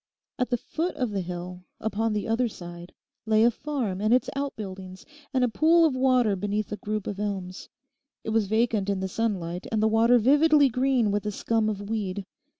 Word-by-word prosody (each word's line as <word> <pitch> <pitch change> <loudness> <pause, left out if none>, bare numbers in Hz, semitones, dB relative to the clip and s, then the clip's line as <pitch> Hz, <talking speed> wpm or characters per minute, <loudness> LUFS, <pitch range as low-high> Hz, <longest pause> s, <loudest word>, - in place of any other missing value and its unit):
At 250 - 0
the 245 - +1
foot 330 +9 -3
of 250 -4 -2
the 200 -2 -1
hill, 180 0 -6 0.2
upon 220 +1 -1
the 210 - -2
other 230 +2 +1
side, 175 -4 -10 0.4
lay 220 0 +4
a 240 - +5
farm 235 -8 -3
and 215 +1 +1
its 250 +1 +3
out 280 0 -3
buildings, 190 -2 -8 0.3
and 260 -2 +1
a - - +4
pool 325 +7 +4
of 295 -5 +1
water 255 -5 +3
beneath 205 +2 -2
a 210 - -3
group 215 -1 -4
of 200 -1 -5
elms. 190 -3 -4 0.5
It 220 - -3
was 220 -2 +1
vacant 220 -2 +1
in 200 -1 0
the 190 - -2
sunlight, 185 -4 -3
and 220 - +1
the 215 - +3
water 225 +3 +4
vividly 290 +4 +5
green 250 -3 +1
with 205 +1 -1
a - - -1
scum 220 +1 0
of 205 -1 -5
weed. 200 -3 -3
215 Hz, 205 wpm, -26 LUFS, 195-245 Hz, 0.5 s, a